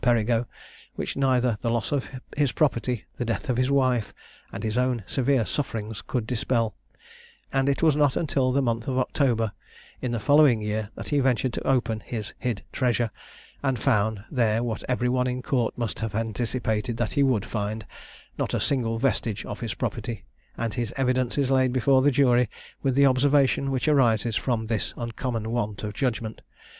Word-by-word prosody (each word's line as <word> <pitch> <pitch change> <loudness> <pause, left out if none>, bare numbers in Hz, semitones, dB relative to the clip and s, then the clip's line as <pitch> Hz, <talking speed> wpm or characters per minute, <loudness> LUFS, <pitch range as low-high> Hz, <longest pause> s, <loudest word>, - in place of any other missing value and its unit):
Perigo, 120 -1 +2 0.5
which - - -3
neither 125 -5 +2
the 115 - 0
loss 115 -1 -1
of 140 -3 -1 0.3
his 145 -4 +2
property, 125 -5 0
the - - -1
death 120 +5 -3
of 120 - -1
his 130 +1 +2
wife, 130 -5 +1 0.4
and - - -6
his 110 -1 -1
own 125 -3 +1
severe 130 -3 +1
sufferings, 110 -6 -3
could 120 -4 -2
dispel; 115 -1 0 0.8
and 135 +1 +2
it 140 - 0
was 155 -3 +5
not 145 -3 +3
until 135 -5 +1
the 140 +1 +2
month 115 -2 -1
of 130 -1 -1
October 125 -4 +1 0.5
in 125 - -2
the 120 - -1
following 145 -2 +5
year, 105 0 -2
that - - -7
he 145 - +2
ventured 130 -2 +1
to - - -4
open 120 -4 +1
his 110 -2 -5
hid 120 -5 -2
treasure, 120 -3 +1 0.5
and 135 -2 0
found 105 -1 +1
there 115 -3 +2
what 115 -3 -3
every 125 -1 +1
one 125 0 +1
in 125 0 -3
court 125 -6 0
must 115 -4 -3
have 110 -2 -3
anticipated 115 0 -1
that 120 -2 -1
he 140 - +2
would 130 -7 +2
find, 105 0 -3 0.5
not - - 0
a - - +1
single 115 -5 0
vestige 115 -4 -1
of 105 - -6
his 115 -4 -3
property; 115 -3 -4 0.3
and 115 -2 -2
his 120 -3 -2
evidence 130 -1 +1
is 135 -2 +1
laid 130 -1 +3
before 130 +1 +4
the 145 - +5
jury 125 -4 +3 0.3
with 135 -2 +1
the 140 0 +6
observation 135 +1 +3
which 135 +2 -1
arises 120 -6 +3
from 115 -3 0
this 110 -2 -2
uncommon 115 -1 -3
want 110 -4 -2
of 105 -1 -3
judgment. 115 -2 -2
120 Hz, 185 wpm, -26 LUFS, 115-130 Hz, 0.8 s, the